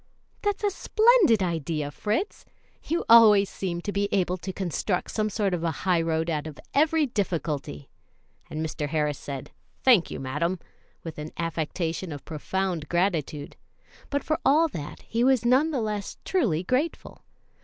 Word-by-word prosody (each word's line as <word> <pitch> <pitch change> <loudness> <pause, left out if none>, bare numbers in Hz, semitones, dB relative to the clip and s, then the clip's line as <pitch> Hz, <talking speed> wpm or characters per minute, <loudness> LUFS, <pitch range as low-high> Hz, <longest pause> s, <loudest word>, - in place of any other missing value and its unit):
"That's 410 0 -1
a 410 - +2
splendid 425 - +4
idea, 160 -4 -2
Fritz; 215 - -2 0.4
you 335 +2 -1
always 215 -4 +7
seem 175 -3 -3
to 205 - -3
be 200 0 0
able 185 -2 +1
to 190 +2 -5
construct 180 0 -2
some 215 -1 0
sort 205 -2 0
of 170 -2 -2
a 170 - +1 0.2
highroad 165 -3 +1
out 155 -2 -2
of 150 - -9
every 310 +1 +3
difficulty;" 160 - -3 0.6
and 155 +1 -3
Mr. 150 -1 -3
Harris 150 -2 0
said, 140 -2 -7 0.3
"Thank 235 -10 +5
you, - - -6
madam," 150 +8 -1 0.5
with 160 -2 -7
an 150 +1 -5
affectation 165 +1 -2
of 145 -2 -8
profound 175 +1 -3
gratitude; 165 -5 -1 0.5
but 285 0 -1
for 310 - -1
all 315 +4 +5
that 150 - -7
he 230 +1 -1
was 255 -2 +3
none 260 +6 +4
the 275 -6 -1
less 210 -2 -3
truly 205 - +1
grateful. 260 - -2
185 Hz, 155 wpm, -26 LUFS, 160-235 Hz, 0.6 s, always